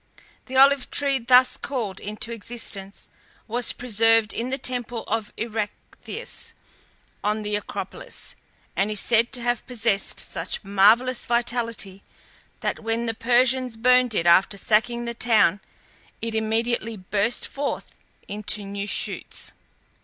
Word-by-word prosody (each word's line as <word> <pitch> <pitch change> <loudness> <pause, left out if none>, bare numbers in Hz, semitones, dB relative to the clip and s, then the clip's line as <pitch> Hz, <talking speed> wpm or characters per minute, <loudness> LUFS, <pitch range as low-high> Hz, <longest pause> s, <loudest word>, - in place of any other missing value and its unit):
The 260 0 -3
olive 275 0 +5
tree 280 -2 +1
thus 250 +1 +5
called 220 -9 -3
into 215 +3 -4
existence 210 -3 -5 0.4
was 240 +2 0
preserved 225 -2 +2
in 235 +2 -2
the 265 - -1
temple 245 -3 -1
of 220 -1 -2
Erectheus, 220 -2 -5 0.7
on 210 +1 0
the 210 0 -1
Acropolis, 485 - -5 0.4
and 200 +2 +1
is 210 -1 0
said 235 0 +3
to 245 -2 -4
have 240 -1 0
possessed 225 -5 +1
such - - -3
marvellous 215 +6 +4
vitality, 230 -5 -1 0.6
that - - -2
when 225 +1 -1
the 225 - -1
Persians 250 +1 +2
burned 250 0 +4
it 170 - +1
after 185 +4 +5
sacking 235 +4 +1
the 235 - -3
town 215 -5 +3 0.6
it 230 0 -3
immediately 225 +1 -1
burst 200 +5 0
forth 280 0 -4 0.3
into 210 0 -2
new 200 0 -4
shoots. - - -3
230 Hz, 130 wpm, -24 LUFS, 210-245 Hz, 0.7 s, olive